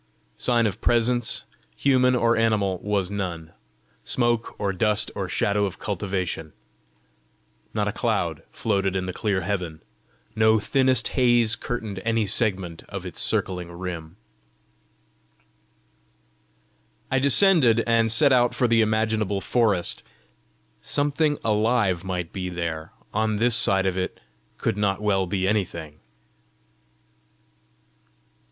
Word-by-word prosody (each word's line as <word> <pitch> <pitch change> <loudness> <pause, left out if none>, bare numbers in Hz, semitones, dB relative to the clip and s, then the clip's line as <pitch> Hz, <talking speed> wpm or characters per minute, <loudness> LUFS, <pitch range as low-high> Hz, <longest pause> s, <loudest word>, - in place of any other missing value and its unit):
Sign 120 -2 +2
of 105 -4 -3
presence, 120 0 +1 0.3
human 130 -2 +3
or 115 -1 +2
animal, 105 -5 +1
was 100 -2 -1
none 85 -5 -4 0.5
smoke 120 -2 0
or 100 -1 -1
dust 105 +3 0
or - - -4
shadow 100 0 +1
of 95 -1 -5
cultivation. 95 -6 -3 1.2
Not - - 0
a - - 0
cloud - - -1
floated 100 -3 -1
in 95 -1 -1
the 90 - -4
clear 100 -2 -1
heaven; 90 -4 -3 0.6
no 110 0 +4
thinnest 130 +5 +2
haze 120 -3 +3
curtained 110 -4 -5
any 115 -1 +1
segment 95 -5 -1
of - - -6
its - - -5
circling 90 -2 -2
rim. 85 -2 -7 3.0
I 135 - +2
descended, 140 - +4
and 115 -1 +2
set 135 +5 +4
out 120 -1 +3
for 125 - +2
the 115 -1 +3
imaginable 110 -2 0
forest: 105 -4 +1 0.8
something 145 +1 +1
alive 105 -4 +1
might 90 -3 -4
be 90 -1 -4
there; 80 -3 -4 0.2
on 110 0 0
this 115 +2 +3
side 95 -5 +4
of 95 0 0
it 90 - -4 0.4
could - - -1
not 100 -2 0
well 100 -3 +1
be 95 0 -1
anything! 85 -7 -2
105 Hz, 120 wpm, -24 LUFS, 95-115 Hz, 3.0 s, no